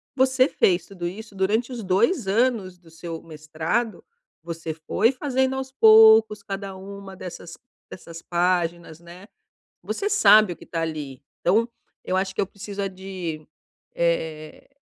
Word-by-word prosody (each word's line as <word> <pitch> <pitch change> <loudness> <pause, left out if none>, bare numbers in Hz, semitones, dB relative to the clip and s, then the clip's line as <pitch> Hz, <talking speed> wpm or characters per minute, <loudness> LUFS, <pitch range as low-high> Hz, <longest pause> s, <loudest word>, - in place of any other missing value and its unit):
você 260 0 +3
fez 180 - +1
tudo 175 -3 -6
isso 210 +3 -9
durante 220 +6 0
os 240 -2 -5
2 210 - +1
anos 210 -4 0
do 170 -2 -20
seu 165 0 -7
mestrado. 160 +8 -3 0.4
Você 165 -1 -5
foi 180 +9 +1
fazendo 265 -1 -1
aos 265 0 -5
poucos, 220 -3 +6
cada 195 -1 -6
uma 195 0 -10
dessas 175 -2 -9 0.3
dessas 170 -2 -10
páginas, 170 -2 -1
né. 175 +4 -14 0.6
Você 410 - -2
sabe 215 - +6
o - - -8
que - - -14
está 165 - -4
ali". 150 -4 -5 0.2
Então, 225 +6 +2 0.4
eu 185 - -1
acho 190 0 -1
que - - -1
eu 195 - 0
preciso 200 +1 -8
é 195 - -1
de 185 -5 -7 0.5
eh, 160 -2 -2
190 Hz, 150 wpm, -24 LUFS, 170-220 Hz, 0.6 s, poucos